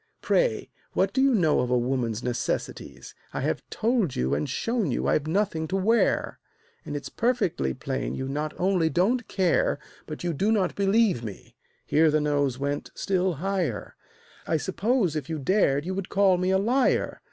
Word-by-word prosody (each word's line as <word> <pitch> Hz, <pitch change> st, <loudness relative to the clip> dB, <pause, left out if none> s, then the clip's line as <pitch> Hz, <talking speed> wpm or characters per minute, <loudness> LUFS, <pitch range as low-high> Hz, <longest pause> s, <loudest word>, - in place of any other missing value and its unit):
Pray, -, -, +1 dB, 0.2 s
what 195 Hz, +1 st, +1 dB
do 265 Hz, -, +2 dB
you 270 Hz, -2 st, +4 dB
know 160 Hz, -7 st, +3 dB
of 125 Hz, -, 0 dB
a 125 Hz, -, +3 dB
woman's 120 Hz, -2 st, -1 dB
necessities? 120 Hz, -1 st, -4 dB, 0.2 s
I -, -, -3 dB
have -, -, -1 dB
told 225 Hz, -, 0 dB
you 65 Hz, +2 st, 0 dB
and 75 Hz, +1 st, -1 dB
shown 230 Hz, -7 st, -1 dB
you -, -, -1 dB
I've 155 Hz, 0 st, +1 dB
nothing 165 Hz, -2 st, 0 dB
to 185 Hz, -, -2 dB
wear, 220 Hz, +5 st, +1 dB, 0.4 s
And 145 Hz, -, -6 dB
it's 145 Hz, -, -5 dB
perfectly 210 Hz, -, 0 dB
plain -, -, -3 dB
you 130 Hz, -, -4 dB
not 150 Hz, +3 st, -3 dB
only 180 Hz, -3 st, +2 dB
don't 205 Hz, -, +1 dB
care, 185 Hz, -4 st, +1 dB, 0.3 s
But 155 Hz, +2 st, -7 dB
you 175 Hz, -1 st, -1 dB
do 200 Hz, +9 st, +1 dB
not 200 Hz, -5 st, +1 dB
believe 200 Hz, -, +2 dB
me" 105 Hz, -4 st, -9 dB, 0.3 s
(here 160 Hz, +1 st, +4 dB
the 155 Hz, 0 st, +2 dB
nose 145 Hz, -3 st, 0 dB
went 140 Hz, +1 st, -3 dB
still 185 Hz, -2 st, 0 dB
higher). 185 Hz, +2 st, -2 dB, 0.5 s
"I 160 Hz, -, +2 dB
suppose, 195 Hz, -, 0 dB
if 150 Hz, -2 st, -4 dB
you 160 Hz, -, -2 dB
dared, 145 Hz, -2 st, +2 dB
you 185 Hz, -, -2 dB
would 190 Hz, -1 st, -4 dB
call 195 Hz, -2 st, +3 dB
me 185 Hz, +1 st, 0 dB
a 190 Hz, -, +3 dB
liar. 245 Hz, +7 st, +1 dB
175 Hz, 180 wpm, -26 LUFS, 140-200 Hz, 0.5 s, you